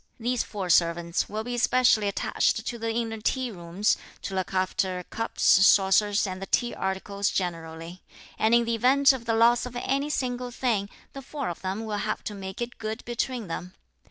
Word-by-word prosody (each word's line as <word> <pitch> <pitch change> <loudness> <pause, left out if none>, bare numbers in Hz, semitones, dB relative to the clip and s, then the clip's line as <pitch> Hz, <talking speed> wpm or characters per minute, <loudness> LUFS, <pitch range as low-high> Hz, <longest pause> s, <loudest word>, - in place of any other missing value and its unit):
These 245 +1 0
four 190 -4 -3
servants 170 0 +2
will 215 +1 -3
be 245 +1 -3
specially 240 -4 +4
attached 200 - 0
to 235 - -4
the 225 0 -2
inner 225 -1 -3
tea 255 +2 -1
rooms 175 +2 0 0.3
to 195 - -4
look 185 -1 -2
after 185 -1 -1
cups, 225 0 -4
saucers 195 +2 +5
and 185 -1 -5
the 195 - -5
tea 240 0 +1
articles 200 +1 -2
generally; 165 -1 -4 0.4
and 220 +2 +4
in 235 0 +3
the 230 - -1
event 270 +5 +5
of 245 -3 -6
the 225 -1 +1
loss 235 +2 +4
of 245 - -10
any 275 +4 -1
single 250 -3 -2
thing, 230 -5 -1 0.2
the 275 - -7
four 280 -2 -4
of 170 - -7
them 195 +4 -3
will 210 -1 -3
have 215 +1 -3
to 210 - -5
make 190 +2 -5
it 240 - -8
good 220 +1 -5
between 240 0 -2
them. 180 +2 -6
215 Hz, 190 wpm, -26 LUFS, 190-240 Hz, 0.4 s, saucers